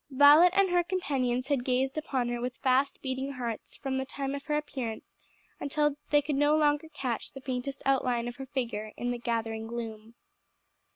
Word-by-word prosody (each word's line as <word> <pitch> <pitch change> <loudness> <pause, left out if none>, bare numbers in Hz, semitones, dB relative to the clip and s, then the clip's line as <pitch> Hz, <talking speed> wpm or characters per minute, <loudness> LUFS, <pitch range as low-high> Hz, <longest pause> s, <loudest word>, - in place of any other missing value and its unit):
Violet 290 +6 +8
and 395 -2 +4
her 355 0 +4
companions 275 -8 -1
had 275 -4 +1
gazed 260 +1 +1
upon 270 -6 -1
her 240 0 -2
with 250 +1 -3
fast 265 +1 +2
beating 265 +1 -3
hearts 235 -4 -5
from 265 -1 -2
the - - 0
time 275 0 -4
of 280 0 -5
her 300 -1 +1
appearance 255 -7 -4 0.5
until 295 0 +1
they 295 -1 +4
could 290 -1 -1
no 290 +1 +4
longer 295 +1 +2
catch 260 -6 -4
the 270 - -8
faintest 260 +1 -4
outline 250 -3 +1
of 240 - -6
her 270 -1 -7
figure 230 -5 -3
in 245 0 -1
the 245 - -3
gathering 225 -1 -2
gloom. 225 -1 -6
265 Hz, 185 wpm, -29 LUFS, 240-290 Hz, 0.5 s, Violet